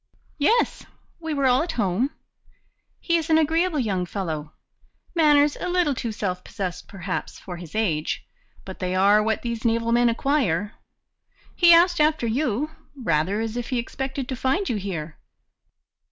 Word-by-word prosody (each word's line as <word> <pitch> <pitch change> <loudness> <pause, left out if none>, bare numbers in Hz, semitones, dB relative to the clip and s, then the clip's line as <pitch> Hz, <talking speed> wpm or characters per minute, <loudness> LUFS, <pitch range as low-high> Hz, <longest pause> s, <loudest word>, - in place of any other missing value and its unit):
"Yes, 450 +12 +2 0.4
we 320 -1 -5
were 280 -1 +1
all 255 +1 +4
at 335 +1 -3
home. 210 +4 0 0.9
He 340 -1 +1
is 325 0 -3
an 315 - +5
agreeable 325 +2 +2
young 195 -8 -1
fellow; 160 -6 -4 0.6
manners 295 -3 +4
a - - -3
little 350 -5 +2
too 240 -3 -3
self 185 -4 -3
possessed, 185 -3 -5
perhaps, 190 -1 -5
for 180 -2 -8
his 170 0 -10
age, 165 -9 -1 0.4
but 190 - -9
they 185 0 -2
are 200 +3 +5
what 220 0 -1
these 235 -2 -3
naval 230 0 +1
men 240 0 +4
acquire. 230 - 0 0.8
He 345 -1 +6
asked 345 0 +6
after 305 -4 +2
you, 255 +4 -1 0.2
rather 190 - 0
as 225 0 -3
if 245 -1 -4
he 255 - -1
expected 265 +2 -4
to 260 - -2
find 270 - 0
you 230 - 0
here." 170 -6 -5
235 Hz, 160 wpm, -24 LUFS, 195-300 Hz, 0.9 s, He